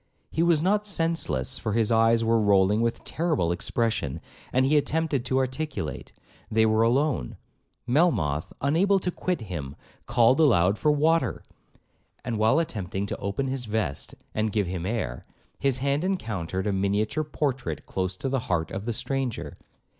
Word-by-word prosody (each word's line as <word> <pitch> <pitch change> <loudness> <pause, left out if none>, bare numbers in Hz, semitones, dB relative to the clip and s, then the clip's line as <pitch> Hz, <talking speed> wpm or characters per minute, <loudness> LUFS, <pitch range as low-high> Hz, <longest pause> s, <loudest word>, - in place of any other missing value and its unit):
He 160 - 0
was 165 -2 +3
not 210 +3 +2
senseless, 165 - 0
for 110 - -2
his 115 0 +2
eyes 115 0 +4
were 115 0 +3
rolling 100 +1 +3
with 115 0 -1
terrible 155 - 0
expression, 110 - -1 0.3
and 130 +1 +3
he 145 +3 +3
attempted 150 -2 +1
to 130 - 0
articulate. 130 - -3 0.4
They 110 0 +3
were 110 0 +3
alone. 125 - +1 0.5
Melmoth, 110 - +1
unable 175 +8 +3
to 180 -1 -2
quit 180 -4 -2
him, 75 -9 -6 0.3
called 120 +2 +4
aloud 105 - +4
for 150 - +3
water; 160 +3 +1 0.8
and 115 -3 -2
while 110 +6 +4
attempting 100 - -2
to - - -4
open 100 +8 -2
his 130 -1 -3
vest, 105 -10 -3 0.2
and 110 0 0
give 105 -2 +1
him 90 0 -4
air, 95 - -3 0.4
his 135 -2 +1
hand 140 +4 0
encountered 105 - -2
a 105 - 0
miniature 100 +9 0
portrait 135 - -3
close 95 0 -3
to 135 - -3
the 135 0 0
heart 80 -3 0
of 100 +2 -5
the 120 - 0
stranger. 130 +1 -3
115 Hz, 160 wpm, -26 LUFS, 100-145 Hz, 0.8 s, eyes